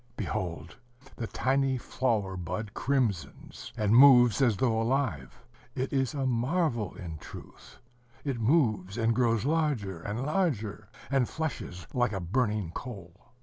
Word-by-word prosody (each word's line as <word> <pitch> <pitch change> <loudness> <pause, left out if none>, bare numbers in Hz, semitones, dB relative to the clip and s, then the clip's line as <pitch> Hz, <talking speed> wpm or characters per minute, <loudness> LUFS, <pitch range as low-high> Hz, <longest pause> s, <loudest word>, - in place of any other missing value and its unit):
Behold! 90 -6 -4 0.4
the 115 - -4
tiny 135 +2 +1
flower 110 -6 -1
bud 90 +5 -5
crimsons, 120 -10 -2
and 105 0 +2
moves 125 -2 +7
as 120 -6 +3
though 115 -2 +1
alive. 115 - -2 0.3
It 130 +2 -2
is 135 +1 0
a 135 -2 -1
marvel, 125 - 0
in 80 -4 -7
truth. - - -12 0.5
It 135 -5 -2
moves, 110 - +2
and 115 0 +2
grows 115 -2 +1
larger 140 - 0
and 110 +8 -3
larger, 115 - -1 0.2
and 135 -3 +2
flushes 120 - -5
like 120 -3 +1
a 95 - -2
burning 105 -1 -1
coal. 100 -6 -8
115 Hz, 135 wpm, -29 LUFS, 100-135 Hz, 0.5 s, moves